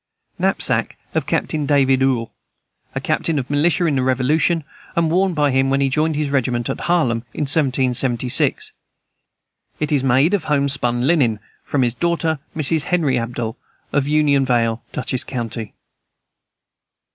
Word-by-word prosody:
Knapsack - - 0 0.2
of - - -1
Captain 150 -2 -1
David 135 -2 +3
Uhl, 130 -4 +1 0.6
a - - 0
captain 165 -2 -1
of 130 -2 -2
militia 160 +4 +2
in 150 -4 +1
the - - +1
Revolution, 140 +6 +1 0.3
and 165 -1 +1
worn 185 0 +2
by 145 -2 +2
him 135 +1 +2
when 135 0 +1
he 135 -1 +2
joined 155 +3 0
his 145 -1 -1
regiment 120 -3 0
at - - -5
Harlem, 155 -10 +1 0.2
in - - -4
1776. 130 -4 +1 1.1
It 150 0 -2
is 140 -3 +2
made 135 +7 +3
of 190 -6 0
homespun 140 -4 0
linen. 135 -9 +2 0.2
From 140 -3 0
his 120 -2 +1
daughter, 165 +1 -1 0.2
Mrs. 155 +1 +1
Henry 170 -8 +1
Abell, 115 -1 -4 0.4
of 145 -1 +1
Union 145 -2 +3
Vale, 115 -3 +1
Dutchess 130 0 -1
county. 115 -4 -5
140 Hz, 145 wpm, -20 LUFS, 125-155 Hz, 1.1 s, David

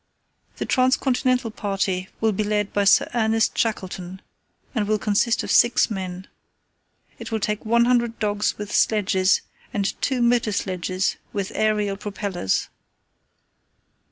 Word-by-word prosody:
"The - - -3
Trans 255 0 +3
continental 255 -2 0
party 195 -3 -2
will 220 0 +2
be 210 +1 -1
led 210 -1 -1
by 205 -1 +1
Sir 195 - +5
Ernest 225 -1 +1
Shackleton, 190 -4 -3 0.5
and 215 -5 -1
will 215 0 +2
consist 210 +3 +1
of - - -3
six 240 -1 +4
men. 185 -2 -5 0.9
It - - -8
will 220 - 0
take 210 0 -2
100 235 +1 +2
dogs 210 -1 -1
with 205 -1 -6
sledges, 195 -3 +2 0.3
and 200 -2 -1 0.2
two 260 -3 +1
motor 235 -3 +2
sledges 185 0 -1 0.2
with 200 -2 -3
aerial 210 -2 0
propellers. 200 - -2
210 Hz, 130 wpm, -23 LUFS, 195-230 Hz, 0.9 s, Sir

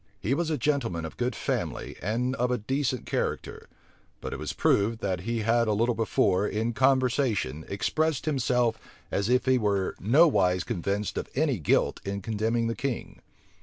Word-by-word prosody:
He 115 - 0
was 165 +3 0
a 155 - 0
gentleman 120 - -1
of 80 - -7
good 125 0 -1
family - - -3
and 120 +6 -1
of 125 +1 +1
a 125 - +1
decent 130 +2 -2
character: - - -3 0.5
but - - -5
it - - -5
was - - -3
proved, 110 +3 +2
that 95 -2 -1
he 115 -1 0
had 115 +2 +2
a 105 - +2
little 115 +4 +2
before, 105 -3 +1
in 110 +2 -1
conversation, 125 - +1
expressed 155 +10 0
himself 125 -5 +1 0.3
as 100 +3 0
if 125 +1 +3
he 130 -1 +3
were 100 -3 0
nowise 110 - +4
convinced 100 -1 -2
of - - -6
any 140 -5 +1
guilt 75 - +1
in 100 0 -4
condemning 115 +2 0
the 115 - 0
king. 135 0 -4
115 Hz, 170 wpm, -27 LUFS, 100-130 Hz, 0.5 s, nowise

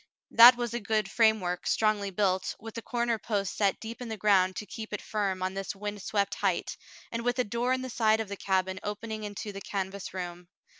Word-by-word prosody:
That 240 +2 +10
was 240 -1 -3
a 240 - -1
good 215 -1 -1
framework, 215 -6 +2
strongly 215 -2 +2
built, 190 -1 0
with 225 0 -9
the 230 - -5
corner 235 -1 -1
posts 200 -4 -2
set 200 -2 +2
deep 230 +2 -8
in 245 - -5
the 220 - -4
ground 190 -2 +3
to 210 - -5
keep 220 +3 -8
it 210 - -2
firm 195 -3 -1
on 185 0 -1
this 195 +1 -4
wind 205 0 -5
swept 200 +1 0
height, - - -1 0.4
and 230 0 -3
with 245 +1 0
a 250 - +3
door 235 +3 -1
in 260 0 0
the 260 - -5
side 220 -2 +3
of 220 - -2
the 200 - -5
cabin 190 -1 0
opening 215 +1 -5
into 205 0 -5
the 195 0 -8
canvas 195 0 -4
room. 175 -1 -6
210 Hz, 220 wpm, -29 LUFS, 195-225 Hz, 0.4 s, That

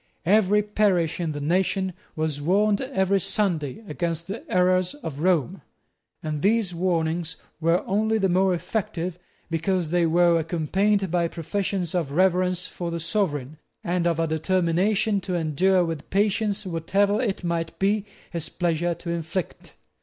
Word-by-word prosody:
Every 210 +2 +4
parish 200 -6 +1
in 165 -3 -1
the 145 - -4
nation 185 +4 0 0.2
was 155 -2 -1
warned 200 +6 +2
every 200 -7 +1
Sunday 190 - -1
against 170 -2 -2
the 205 - -6
errors 185 +5 +2
of 160 - -7
Rome; 165 -6 +1 0.6
and 150 -2 -3
these 210 -2 +2
warnings 165 -2 -1 0.2
were 165 +2 +2
only 220 +3 +1
the 195 -3 +2
more 185 0 +3
effective, 180 -2 -3 0.3
because 165 0 0
they 175 -1 +3
were 170 0 +4
accompanied 185 +4 0
by 170 -1 +2
professions 180 +1 -3
of 165 -6 -1
reverence 180 +1 +2
for 175 -1 -5
the 170 0 -3
Sovereign, 155 -5 -2 0.2
and 175 -2 0
of 165 -1 0
a 165 - +2
determination 185 +5 +1
to 180 0 -3
endure 175 +3 +2
with 165 -3 -5
patience 205 +1 +1
whatever 195 +5 +1
it 205 -7 -2
might 170 -1 -2
be 200 +1 +1 0.3
his 165 -3 -2
pleasure 175 0 0
to 170 - -6
inflict. 170 +1 -4
180 Hz, 145 wpm, -25 LUFS, 165-195 Hz, 0.6 s, Every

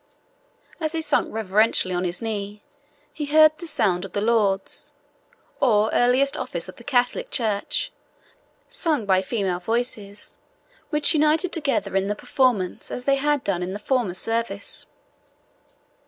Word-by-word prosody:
As 315 -1 -2
he 325 - -1
sunk 295 -2 +2
reverentially 215 -2 +2
on 180 +1 -1
his 175 +4 -2
knee, 210 -2 -4 0.5
he 300 - -4
heard 310 +1 +6
the 340 - -7
sound 190 - +1
of 195 - -8
the - - 0
lauds, 205 -3 0 0.7
or 220 -4 +3
earliest 255 +3 +3
office - - -3
of - - -11
the - - -13
Catholic 245 -3 0
Church, 215 -4 -1 0.8
sung 320 - 0
by 190 -1 +3
female 190 -3 -2
voices, 210 -1 -4 0.5
which 300 0 +3
united 310 +4 +2
together 275 - 0
in 195 0 +1
the 205 - -1
performance 225 -7 0
as 250 - -5
they 275 +1 +2
had 290 0 +1
done 185 -3 -1
in 180 +1 -3
the - - -3
former 220 -4 -1
service. 225 -1 -3
225 Hz, 145 wpm, -23 LUFS, 200-280 Hz, 0.8 s, heard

